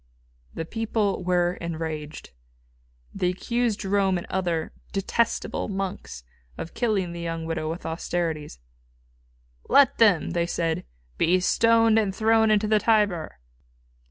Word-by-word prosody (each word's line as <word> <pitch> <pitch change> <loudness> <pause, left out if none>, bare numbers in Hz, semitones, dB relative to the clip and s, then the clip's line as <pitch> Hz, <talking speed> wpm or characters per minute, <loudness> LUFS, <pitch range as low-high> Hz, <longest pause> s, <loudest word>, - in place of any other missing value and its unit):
The 165 - -3
people 215 -1 -1
were 180 0 +1
enraged. 160 -2 -5 0.8
They 180 - 0
accused 235 +4 -1
Jerome, 195 -2 +1
and 175 - -6
other 175 -4 -1 0.2
"detestable 200 +4 -1
monks" 195 - -5 0.3
of 165 - -7
killing 205 -7 0
the 170 - -6
young 165 -1 -4
widow 160 -1 -3
with 165 +2 -6
austerities. 160 - -3 1.1
"Let 280 -3 +5
them," 205 -9 +4
they 170 0 0
said; 165 - -2 0.3
"be 180 +3 +3
stoned 225 +3 +4
and 195 -3 -1
thrown 220 +1 +3
into 215 0 +3
the 215 0 +3
Tiber." 205 -8 +1
185 Hz, 125 wpm, -25 LUFS, 165-215 Hz, 1.1 s, Let